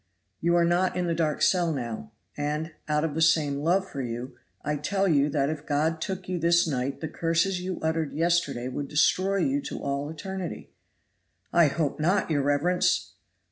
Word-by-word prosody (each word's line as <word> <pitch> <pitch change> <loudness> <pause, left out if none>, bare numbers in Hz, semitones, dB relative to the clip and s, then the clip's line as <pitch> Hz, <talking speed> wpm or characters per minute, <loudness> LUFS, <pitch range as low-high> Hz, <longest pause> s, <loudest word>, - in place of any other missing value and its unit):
You 170 +1 +2
are 170 -1 +4
not 175 +2 +2
in 180 - 0
the 170 - 0
dark 160 -3 0
cell 175 -3 +3
now, 115 - -5 0.2
and, 150 +3 -2 0.2
out 150 0 +1
of 160 -3 -1
the 160 - -2
same 150 -3 +3
love 180 +6 +1
for 140 - -5
you, 120 +1 -5 0.3
I 150 +1 0
tell 195 +7 0
you 145 -4 +3
that 140 0 +1
if 155 -1 -7
God 160 +2 0
took 190 0 -4
you 180 -1 -2
this 170 +1 +3
night 135 -2 -2
the 160 - -2
curses 165 +4 0
you 185 0 -4
uttered 160 -1 -1
yesterday 160 -6 0
would 140 +2 -4
destroy 185 +7 +2
you 275 +8 +1
to - - -6
all 140 +1 -3
eternity." 190 +2 -6 0.8
"I 170 -2 +6
hope 145 0 -1
not, 180 +3 +1
your 145 -2 +2
reverence!" 145 - +1
160 Hz, 185 wpm, -27 LUFS, 145-175 Hz, 0.8 s, I